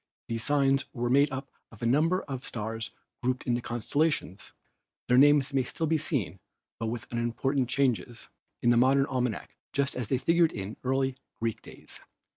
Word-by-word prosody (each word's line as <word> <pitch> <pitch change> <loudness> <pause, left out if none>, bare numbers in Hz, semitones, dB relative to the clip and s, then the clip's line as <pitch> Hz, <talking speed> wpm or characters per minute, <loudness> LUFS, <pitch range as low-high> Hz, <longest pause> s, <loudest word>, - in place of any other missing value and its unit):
These 115 -1 -2
signs 140 -1 +2
were 120 0 -1
made 140 +2 +4
up 135 0 -5 0.2
of 115 0 -12
a - - +1
number 160 +9 +3
of 135 -2 -6
stars 110 0 -4 0.3
grouped 125 +1 -1
into 120 -1 0
constellations. 120 - -1 0.6
Their 125 +1 +5
names 145 0 +5
may 135 - +3
still 145 +6 -2
be 160 0 +1
seen, 110 - -2 0.4
with 115 0 -3
but - - -28
unimportant 125 +2 0
changes, 125 -3 0 0.4
in 120 0 +5
a - - +3
modern 135 +3 +4
almanac 125 - -2 0.2
just 140 0 +1
as 125 -4 -3
they 130 - +1
figured 165 +4 +3
in 100 +1 -5
early 135 0 0 0.2
Greek 115 -1 -2
days. - - -12
130 Hz, 170 wpm, -29 LUFS, 120-140 Hz, 0.6 s, Their